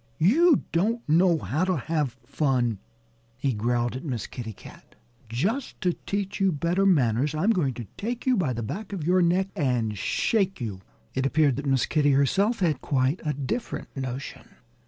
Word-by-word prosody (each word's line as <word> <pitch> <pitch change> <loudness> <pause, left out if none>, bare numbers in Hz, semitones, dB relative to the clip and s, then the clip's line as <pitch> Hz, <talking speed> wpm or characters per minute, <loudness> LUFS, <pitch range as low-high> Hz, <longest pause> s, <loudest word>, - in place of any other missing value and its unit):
"You 300 - +4
don't 225 +8 0
know 170 +2 +4
how 155 +2 -1
to 185 -2 +1
have 145 -2 -2
fun," 125 -8 0 0.6
he 130 0 0
growled 120 +3 0
at 130 - -6
Miss 125 -8 -3
Kitty 115 -3 -6
Cat. 105 - -15 0.3
"Just 200 - -2
to 180 -1 +2
teach 200 +1 -2
you 195 -1 +3
better 170 +6 +1
manners 140 - +2
I'm 185 +9 +2
going 145 - 0
to 120 - -6
take 235 +3 -4
you 260 -1 +4
by 170 - +1
the 115 0 -4
back 200 - -5
of 170 -6 -4
your 180 +2 +4
neck 180 +3 +2
and 120 -7 0
shake 195 - 0
you." 105 -6 -5 0.3
It 130 +1 +1
appeared 145 -2 +3
that 140 0 -4
Miss 135 -2 +2
Kitty 145 -3 +2
herself 195 - +2
had 155 -7 +1
quite 135 +4 0
a 150 -2 0
different 140 - -4
notion. 130 0 -6
150 Hz, 180 wpm, -26 LUFS, 130-190 Hz, 0.6 s, You